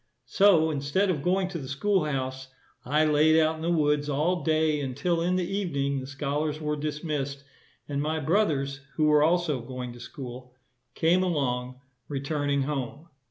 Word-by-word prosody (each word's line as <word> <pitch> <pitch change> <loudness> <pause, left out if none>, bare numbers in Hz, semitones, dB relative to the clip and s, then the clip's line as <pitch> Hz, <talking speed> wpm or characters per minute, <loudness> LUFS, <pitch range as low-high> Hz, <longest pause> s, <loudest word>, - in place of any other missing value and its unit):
So, 175 -6 +4
instead 150 +7 +1
of 150 -6 -2
going 185 +3 +1
to 175 -3 -5
the 135 - -7
school 180 +7 +1
house, 130 -2 -3 0.4
I 150 +5 +2
laid 155 +1 +4
out 160 0 +2
in - - -9
the 165 - -1
woods 150 -3 +2
all 155 +5 +1
day 155 0 +2
until 155 +6 -1
in 180 +2 +1
the 180 -2 0
evening 140 -9 -1
the 130 - -7
scholars 145 +2 -2
were 150 -1 -1
dismissed, 150 -2 -3 0.4
and 140 -1 -2
my 155 +2 -1
brothers, 145 -5 0
who 155 - +1
were 150 -1 +5
also 160 -4 +2
going 125 0 -6
to 120 - -12
school, 125 -1 -9 0.4
came 170 +3 +3
along, 130 -7 -1 0.3
returning 140 0 -1
home. 145 +3 -4
150 Hz, 165 wpm, -27 LUFS, 140-160 Hz, 0.4 s, were